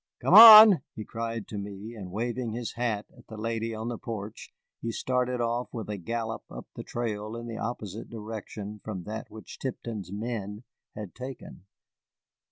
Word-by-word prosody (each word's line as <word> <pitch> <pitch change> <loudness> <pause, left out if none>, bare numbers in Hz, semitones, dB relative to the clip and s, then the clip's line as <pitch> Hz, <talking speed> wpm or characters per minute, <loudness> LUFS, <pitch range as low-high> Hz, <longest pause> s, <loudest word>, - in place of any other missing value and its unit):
"Come - - +1
on," 215 - +12
he 110 - -6
cried 115 -1 -5
to 105 - -5
me, 100 +3 -8
and, 95 -5 -9
waving 120 +2 -3
his 120 0 -5
hat 115 -4 -2
at - - -19
the 110 - -10
lady 115 +1 -3
on 110 +1 -5
the 120 -2 -4
porch, 110 -2 -7 0.3
he 115 - -3
started 125 +1 -1
off 120 +1 -2
with 110 -3 -6
a 105 - -4
gallop 115 +4 -4
up - - -9
the - - -6
trail 110 -2 -4
in 115 0 -7
the 115 -1 -6
opposite 110 -3 -5
direction 105 -2 -7
from 95 -5 -6
that 110 +3 -7
which 110 - -11
Tipton's 115 -7 -5
men 105 0 -5 0.3
had 105 -4 -7
taken. 130 -7 -9
115 Hz, 175 wpm, -28 LUFS, 105-120 Hz, 0.3 s, on